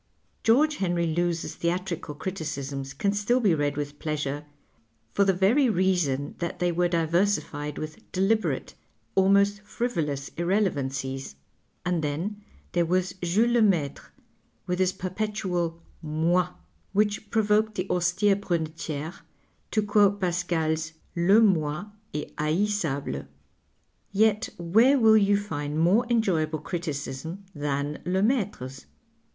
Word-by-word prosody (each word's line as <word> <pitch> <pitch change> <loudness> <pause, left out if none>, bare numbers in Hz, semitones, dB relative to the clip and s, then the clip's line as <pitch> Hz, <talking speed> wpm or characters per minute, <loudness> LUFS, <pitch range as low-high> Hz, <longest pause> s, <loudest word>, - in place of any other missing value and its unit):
George 290 +7 +4
Henry 175 -2 0
Lewes's 170 +1 -1
theatrical 170 -3 -2
criticisms 140 -6 -4
can 200 +9 0
still 210 +5 +2
be 205 -8 +3
read 145 -2 0
with 145 0 -4
pleasure 150 -2 -3 0.7
for 200 - +4
the 195 - +4
very 215 +9 +3
reason 175 -8 +1
that 170 -1 -3
they 175 0 +1
were 175 +1 +2
diversified 165 -3 0
with 155 0 -8
deliberate, 200 +4 0 0.4
almost 200 +2 +4
frivolous 165 - -2
irrelevancies. 135 - -1 0.5
And 175 -3 0
then 175 +9 -3 0.3
there 175 -1 +1
was 180 +1 +1
Jules 205 +7 +2
Lemaitrc 195 - +2 0.6
with 180 0 -2
his 185 -1 +3
perpetual 185 -3 -2
" - - -34 0.2
moi," 180 +1 +3 0.4
which 210 +1 +1
provoked 215 0 +2
the 185 0 -2
austere 180 +3 +3
Brunetiere 160 -4 -3 0.6
to 215 - +1
quote 205 -1 +3
Pascal's 165 -3 0
" - - -37
le 190 +6 +5
inoi 175 -1 +1 0.2
est 150 - -5
haissable.'' 155 - -1 0.8
Yet 215 +1 +2
where 220 +11 +4
will 220 -3 +6
you 200 -1 +4
find 150 -7 -4
more 200 +9 +4
enjoyable 175 -10 +1
criticism 160 +2 -5
than 145 0 -2
Lemaitre's 190 - -1
175 Hz, 120 wpm, -26 LUFS, 155-205 Hz, 0.8 s, will